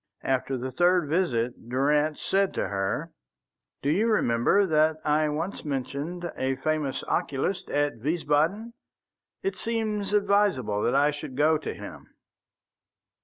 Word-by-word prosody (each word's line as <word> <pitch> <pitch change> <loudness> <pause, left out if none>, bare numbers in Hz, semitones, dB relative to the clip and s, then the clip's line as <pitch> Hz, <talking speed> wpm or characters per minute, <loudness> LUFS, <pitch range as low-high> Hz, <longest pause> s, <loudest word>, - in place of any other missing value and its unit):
After 135 0 0
the 130 +1 -4
third 175 +3 +3
visit 125 -8 -1
Durrance 150 +4 +1
said 195 0 +1
to - - -1
her: 95 -1 -2 0.7
"Do 140 - +2
you 205 +8 +2
remember 200 - +3
that 155 -2 +3
I 150 0 +2
once 165 +6 -3
mentioned 145 +5 -4
a 130 0 -1
famous 150 0 -1
oculist 145 +7 -1
at 145 -5 0
Wiesbaden? 165 - 0 0.7
It 390 - -2
seems 215 -4 -2
advisable 200 - +2
that 120 - +1
I 145 +2 +4
should 145 -3 -7
go 155 +1 +4
to - - -5
him." - - -11
150 Hz, 130 wpm, -27 LUFS, 135-185 Hz, 0.7 s, I